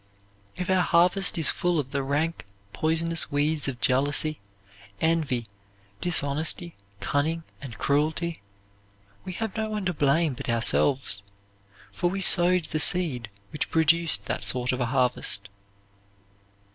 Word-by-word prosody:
If 180 -1 -5
our 185 -1 +2
harvest 180 +3 +3
is 160 - +4
full 175 -2 -1
of 135 -2 -5
the 140 - -1
rank, 145 -1 -2 0.3
poisonous 165 +1 +1
weeds 145 +1 0
of 130 -3 -4
jealousy, 145 +4 +2 0.6
envy, 155 -8 0 0.6
dishonesty, 160 +1 0 0.3
cunning, 160 +4 -1 0.2
and 130 -5 -9
cruelty, 160 +4 -1 0.8
we 185 - -6
have 220 +2 -5
no 220 -1 -3
one 210 -2 -4
to 180 - -1
blame 150 +1 +1
but 130 +1 -7
ourselves, 115 -1 +2 0.7
for 175 - -1
we 195 +2 -4
sowed 180 -2 +5
the 155 - -3
seed 150 -10 +2 0.2
which 150 - -3
produced 160 -8 +2
that - - -3
sort 125 0 -1
of 125 - -3
a 125 - 0
harvest. 120 -6 -1
155 Hz, 135 wpm, -25 LUFS, 135-170 Hz, 0.8 s, sowed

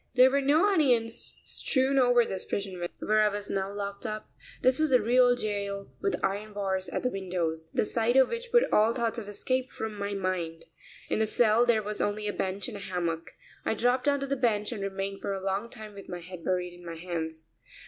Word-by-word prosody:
There 255 +1 +7
were 280 +1 +2
no 295 +7 +4
onions 250 - +2
strewn 270 0 +2
over 245 -2 +5
this 190 -3 -2
prison 190 -3 -4
where 215 0 +2
I 215 - +5
was 205 0 -3
now 195 0 -1
locked 200 0 -5
up. 215 -2 -5 0.3
This 255 +2 +4
was 310 -2 +2
a 250 - +6
real 245 +2 +4
jail 200 -3 -3
with 400 -1 0
iron 205 +2 -3
bars 190 -2 -2
at - - -3
the 250 - +1
windows, 170 -4 -3
the - - +1
sight 235 +3 +1
of 265 - +6
which 470 0 -5
put 485 0 +6
all 220 +2 +4
thought 235 -1 -1
of 205 -2 -8
escape 255 +5 -1
from 220 -1 -5
my 200 0 -3
mind. 175 -4 -2 0.4
In - - +1
the 220 - +2
cell 230 +2 +4
there 220 -3 +3
was 210 0 -3
only 210 +1 -1
a 205 - -1
bench 190 +1 -2
and 225 -4 -6
a - - -8
hammock. 170 -4 -3 0.3
I - - 0
dropped 250 +4 +1
onto 280 -1 +2
the 275 0 -1
bench 220 -5 +1
and 220 -4 -4
remained 195 0 -3
for 200 - -2
a 195 - -3
long 195 +4 -1
time 215 -3 -9
with 200 -1 -11
my 175 -1 -5
head 175 0 -9
buried 180 -1 -1
in 175 0 -14
my 170 -1 -6
hands. 160 -2 -5
210 Hz, 220 wpm, -29 LUFS, 190-245 Hz, 0.4 s, There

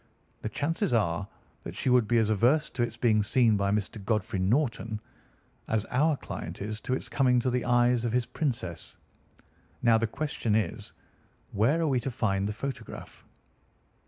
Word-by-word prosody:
The - - -3
chances 165 - 0
are 100 -3 0 0.3
that - - -8
she - - -3
would 125 -3 +4
be 120 - +3
as 110 -1 +2
averse 125 +9 +3
to 125 - -3
its 120 - -1
being 110 -3 +3
seen 110 +1 +3
by 100 -1 +1
Mr. 105 0 -2
Godfrey 105 -2 -1
Norton, 115 +1 0 0.7
as 110 -1 0
our 150 +4 +2
client - - -7
is 105 +2 -4
to 130 - -1
its - - -5
coming 125 -2 +3
to 125 +1 0
the 125 0 0
eyes 120 -1 +3
of 120 - 0
his 125 0 +1
princess. 120 - -4 0.9
Now 115 -2 +5
the 115 - +1
question 120 -4 -2
is, 105 -6 -2 0.6
Where 115 +11 +2
are 165 - +1
we 130 -4 +2
to 135 - -3
find 100 -4 0
the - - -1
photograph?" 135 +3 -7
115 Hz, 175 wpm, -28 LUFS, 105-125 Hz, 0.9 s, Now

